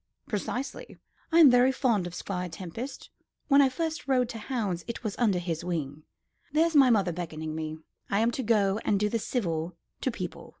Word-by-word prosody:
"Precisely. 245 Hz, +5 st, -4 dB, 0.3 s
I 330 Hz, -, +5 dB
am 290 Hz, -5 st, +9 dB
very 245 Hz, +1 st, +5 dB
fond 230 Hz, -9 st, +1 dB
of 175 Hz, -, -8 dB
Squire 180 Hz, -1 st, -4 dB
Tempest. 190 Hz, +11 st, -7 dB, 0.4 s
When 280 Hz, 0 st, +7 dB
I 270 Hz, -, +5 dB
first 320 Hz, +4 st, -3 dB
rode 250 Hz, -3 st, +2 dB
to 230 Hz, -, -6 dB
hounds 210 Hz, -7 st, -2 dB
it 235 Hz, 0 st, -5 dB
was 215 Hz, -3 st, -3 dB
under 215 Hz, -6 st, +3 dB
his 170 Hz, -2 st, -3 dB
wing. 155 Hz, -5 st, -3 dB, 0.5 s
There's 320 Hz, +2 st, +2 dB
my 275 Hz, -3 st, +7 dB
mother 200 Hz, -6 st, +3 dB
beckoning 160 Hz, -2 st, -5 dB
me; 155 Hz, 0 st, -4 dB, 0.3 s
I 200 Hz, +2 st, +2 dB
am 230 Hz, +1 st, +3 dB
to 260 Hz, -, -3 dB
go 210 Hz, -3 st, +2 dB
and 200 Hz, -, +2 dB
do 210 Hz, +1 st, +1 dB
the 230 Hz, -, 0 dB
civil 170 Hz, -8 st, -2 dB, 0.3 s
to -, -, +1 dB
people." 185 Hz, -7 st, -6 dB
210 Hz, 190 wpm, -28 LUFS, 175-255 Hz, 0.5 s, am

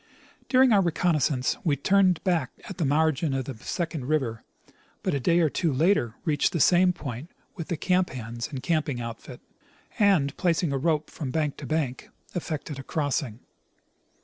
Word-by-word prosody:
During 260 Hz, -1 st, +5 dB
our 205 Hz, -3 st, +5 dB
reconnoissance 155 Hz, -6 st, +1 dB
we 155 Hz, -6 st, +2 dB
turned 185 Hz, +4 st, +3 dB
back 170 Hz, -9 st, +1 dB, 0.2 s
at 195 Hz, -2 st, -8 dB
the 165 Hz, -, +1 dB
margin 155 Hz, 0 st, +1 dB
of 130 Hz, -2 st, -2 dB
the 135 Hz, -, -6 dB
second 160 Hz, +2 st, -4 dB
river,' 130 Hz, -7 st, -1 dB, 0.6 s
but -, -, 0 dB
a 140 Hz, -, 0 dB
day 170 Hz, +7 st, +3 dB
or 160 Hz, -, +3 dB
two 165 Hz, -4 st, 0 dB
later 135 Hz, -, +2 dB
reached 150 Hz, -3 st, +1 dB
the 170 Hz, -, 0 dB
same 180 Hz, +4 st, +5 dB
point 140 Hz, -3 st, -7 dB, 0.3 s
with 165 Hz, -4 st, -6 dB
the 170 Hz, -, -2 dB
camp 185 Hz, +2 st, +1 dB
hands 115 Hz, -2 st, -5 dB
and 135 Hz, -3 st, -7 dB
camping 155 Hz, -6 st, 0 dB
outfit, 120 Hz, +2 st, -8 dB, 0.6 s
and, 185 Hz, -10 st, +3 dB
placing 170 Hz, -3 st, +1 dB
a -, -, +1 dB
rope 155 Hz, +1 st, 0 dB
.from 145 Hz, -, -5 dB
bank 150 Hz, 0 st, -1 dB
to 145 Hz, -, -7 dB
bank, 135 Hz, -4 st, -2 dB, 0.2 s
effected 155 Hz, -4 st, -4 dB
a -, -, -7 dB
crossing. 140 Hz, -6 st, -2 dB
155 Hz, 175 wpm, -26 LUFS, 135-175 Hz, 0.6 s, During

